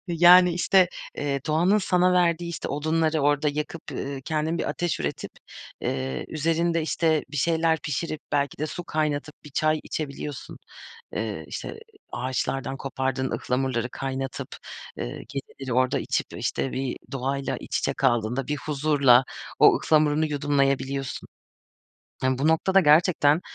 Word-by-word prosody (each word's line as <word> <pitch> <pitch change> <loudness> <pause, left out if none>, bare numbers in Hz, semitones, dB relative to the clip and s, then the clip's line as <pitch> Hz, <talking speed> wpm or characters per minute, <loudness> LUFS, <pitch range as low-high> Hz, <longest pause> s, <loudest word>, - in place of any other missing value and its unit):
Yani, 175 +1 +7
işte, 180 +1 +4 0.3
ııı, 140 -1 -1
doğanın 175 +7 +3
sana 180 -1 +2
verdiği, 170 -1 +2
işte, 170 - -5
odunları 155 +1 0
orada 145 +1 +2
yakıp, 150 +2 -4
ııı, 140 -1 -4
kendin 160 +2 -1
bir - - -2
ateş 175 -3 -2
üretip, - - -3 0.5
ııı, 65 -1 -2
üzerinde, 165 +1 0
işte, 160 -1 +1
bir 150 - -6
şeyler 160 +2 +2
pişirip, 155 +2 -3
belki 140 -2 0
de 155 - -1
su 175 +2 -6
kaynatıp 150 -1 -2
bir 150 - -11
çay 155 +2 +1
içebiliyorsun. 145 -2 -6 0.6
Iıı, - - -3
işte, - - -6 0.3
ağaçlardan 130 +2 -2
kopardığın 130 -1 -2
ıhlamurları 125 -1 -1
kaynatıp, 135 0 -4 0.5
ııı, - - -2 0.2
geceleri 135 -2 -6
orada 130 +2 +2
içip, - - -1
işte, 135 - -2
bir 130 -1 -3
doğayla 135 +1 -2
iç - - -3
içe - - -1
kaldığında 120 0 0
bir 150 0 -1
huzurla 140 -4 +4 0.4
o - - +8
ıhlamurunu 155 0 +3
yudumlayabiliyorsun. 140 -2 -1 0.9
Bu 130 +4 +1
noktada 190 +4 +4
gerçekten, 155 -1 +4
150 Hz, 135 wpm, -25 LUFS, 135-160 Hz, 0.9 s, o